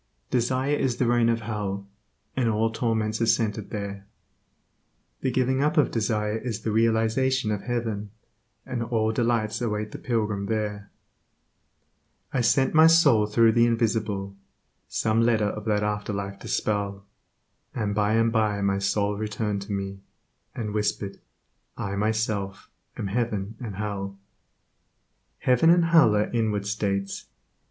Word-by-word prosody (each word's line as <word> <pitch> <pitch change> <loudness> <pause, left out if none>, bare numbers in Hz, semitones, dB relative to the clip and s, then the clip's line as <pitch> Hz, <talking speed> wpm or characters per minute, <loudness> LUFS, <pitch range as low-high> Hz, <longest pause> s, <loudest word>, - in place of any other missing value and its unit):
Desire 130 +3 +1
is 130 -4 0
the 125 - +1
region 120 -1 +3
of 115 0 +1
hell, 100 -3 -4 0.5
and 125 -3 +1
all 110 +1 +1
torments 110 -1 -1
are 115 - +2
centered 110 -2 0
there. 100 -2 -5 1.1
The - - 0
giving 130 +1 +1
up 150 +4 +1
of 150 - +4
desire 105 -1 0
is 115 -3 -4
the 110 - -2
realization 115 +2 +2
of 105 -2 -2
heaven, 115 -4 -3 0.6
and 125 -2 -3
all 115 -2 0
delights 115 -2 0
await 105 -2 -2
the - - -7
pilgrim 105 -4 -1
there, 105 -2 -3 1.4
I 130 - +2
sent 135 +3 +3
my 160 +1 +8
soul 140 -10 +5
through 115 +1 +4
the 115 +1 +4
invisible, 110 -4 -1 0.5
Some 110 +1 +1
letter 115 -2 +3
of 105 0 -6
that 105 -2 +1
after 105 0 -2
life 100 0 -4
to - - -9
spell, 100 -2 -1 0.7
And 105 -4 -1
by 105 +1 +1
and 115 0 +3
by 110 -2 +1
my 100 0 +1
soul 100 +1 0
returned 105 -1 -2
to - - -6
me, 100 -1 -3 0.6
And 105 -3 -4
whispered, 105 -2 -2 0.6
I 100 0 -3
myself 105 -2 -2 0.3
am - - -3
heaven 105 -1 -2
and 110 -6 -6
hell," 100 -1 -4 1.2
Heaven 130 +6 +3
and 170 0 +5
hell 160 -10 +5
are 105 0 +1
inward 110 -4 0
states. 100 -2 -2
110 Hz, 145 wpm, -26 LUFS, 105-115 Hz, 1.4 s, my